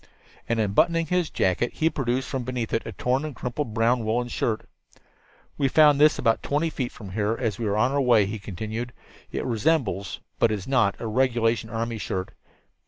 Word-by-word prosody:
And, 115 -1 +1
unbuttoning 165 +11 +2
his 180 0 0
jacket, 95 +6 0
he 160 - +1
produced 130 -4 -1
from 130 -2 -3
beneath 125 -2 -3
it 115 - -1
a - - -4
torn 130 +3 0
and 155 -3 -5
crumpled 120 -2 -4
brown 115 +1 +2
woolen 120 +3 0
shirt. 110 -2 -2 0.9
"We 140 - +3
found 150 0 +5
this 155 0 +6
about 115 -1 +2
twenty 155 +3 0
feet 130 -5 -3
from 100 -4 -10
here 105 +3 0
as 115 -5 -2
we 115 - -1
were 100 +1 0
on 125 +4 +3
our 140 0 +1
way," 120 -5 +5
he 105 +2 -5
continued. 110 +5 -5 0.4
"It - - -3
resembles, 115 - 0 0.2
but 115 - +4
it 110 - 0
is 100 - -7
not, 120 -7 +2
a - - -5
regulation 115 -1 +1
army 115 0 -3
shirt. 95 -1 -3
120 Hz, 195 wpm, -25 LUFS, 110-135 Hz, 0.9 s, this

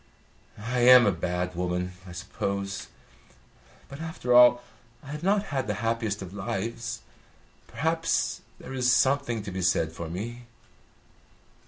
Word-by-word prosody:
"I 120 +4 -3
am 125 0 +8
a 100 - +4
bad 90 +1 -2
woman, 90 +1 -2 0.2
I - - -9
suppose. 100 +3 -4 1.0
But 140 +3 -9
after 160 -6 -2
all, 120 0 +7 0.4
I 140 - -9
have 150 0 -5
not 200 +3 +2
had 135 -4 -1
the 105 - -1
happiest 115 -3 -1
of 95 0 -10
lives. 115 +4 -4 0.7
Perhaps 165 +2 0 0.2
there - - -9
is 125 -1 +2
something 130 -4 +2
to 100 - -6
be 95 +1 -4
said 85 -3 +2
for 85 0 -7
me." 120 +7 -6
115 Hz, 140 wpm, -27 LUFS, 95-125 Hz, 1.0 s, am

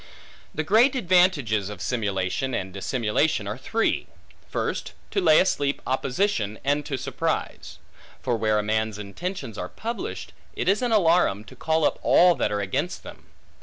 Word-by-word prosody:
The 155 - -1
great 225 - +4
advantages 175 - +2
of 105 -3 -8
simulation 100 +5 -1
and 95 0 -4
dissimulation 110 +3 0
are 105 - -3
three. 225 - -1 0.4
First, - - -3 0.2
to 200 - +1
lay 160 -3 +6
asleep 145 -6 +1
opposition, 130 - 0
and 145 +2 +1
to 135 - -2
surprise. - - -3 0.5
For 125 -2 +1
where 110 -1 +1
a 105 - +1
man's 110 0 -1
intentions 110 - -6
are 90 - -4
published, 235 - -5 0.2
it - - -3
is 200 +4 +3
an 245 -2 0
alarum, 170 - +3
to - - -14
call 160 -1 +1
up - - 0
all 180 0 +6
that 105 - -1
are 105 0 -1
against 95 -1 -2
them. - - -12
130 Hz, 160 wpm, -25 LUFS, -, 0.5 s, lay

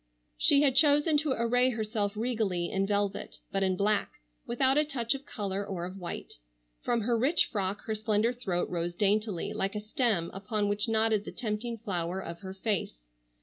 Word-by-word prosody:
She 280 - +5
had 275 -3 +4
chosen 295 +2 +5
to 295 -2 +1
array 245 +2 +3
herself 215 -3 -2
regally, 215 -7 -1
in 195 0 0
velvet, 205 -1 -1
but 195 - 0
in 190 -1 +2
black, 205 +2 +1 0.4
without 260 +2 +2
a 300 - +4
touch 265 -6 0
of 275 +1 -8
color 200 -3 -3
or 190 -4 -4
of 185 +2 -8
white. 175 -2 -6 0.5
From 235 -1 0
her 235 +2 +1
rich 265 +9 +3
frock 200 -1 -2
her 220 - -2
slender 215 +2 +1
throat 195 -8 -2
rose 175 0 -2
daintily, 205 -1 0
like 195 +2 -2
a - - -1
stem 215 -5 0
upon 205 +2 -1
which 205 +3 0
nodded 220 -1 +2
the - - -7
tempting 230 +1 -3
flower 185 -4 -3
of 170 -2 -7
her 190 +1 -8
face. 170 - -3
210 Hz, 185 wpm, -29 LUFS, 195-235 Hz, 0.5 s, She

